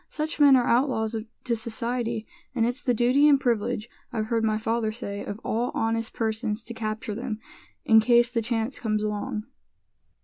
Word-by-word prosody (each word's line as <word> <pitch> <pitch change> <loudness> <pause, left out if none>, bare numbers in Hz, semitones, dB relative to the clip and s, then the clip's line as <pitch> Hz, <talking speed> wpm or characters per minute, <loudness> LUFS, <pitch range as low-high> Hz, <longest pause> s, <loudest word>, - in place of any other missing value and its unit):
"Such 310 0 -4
men 285 -2 +8
are 245 -2 +3
outlaws 235 -3 +1 0.3
to 240 -2 0
society, 230 0 -2 0.3
and 230 -2 +2
it's 245 +4 -2
the 260 - +1
duty 250 +5 +4
and 280 -2 +5
privilege, 230 -3 0 0.2
I've 220 -2 -1
heard 230 -1 +1
my 215 -1 +2
father 225 0 0
say, 205 -3 -5
of 205 - -6
all 240 +3 0
honest 225 0 0
persons 220 -1 -2
to 235 - -7
capture 215 -1 -4
them, 230 0 -4 0.5
in 220 0 +7
case 240 +1 +4
the 235 -2 0
chance 225 +2 -2
comes 215 -2 -1
along." 215 +2 -2
230 Hz, 175 wpm, -26 LUFS, 220-245 Hz, 0.5 s, men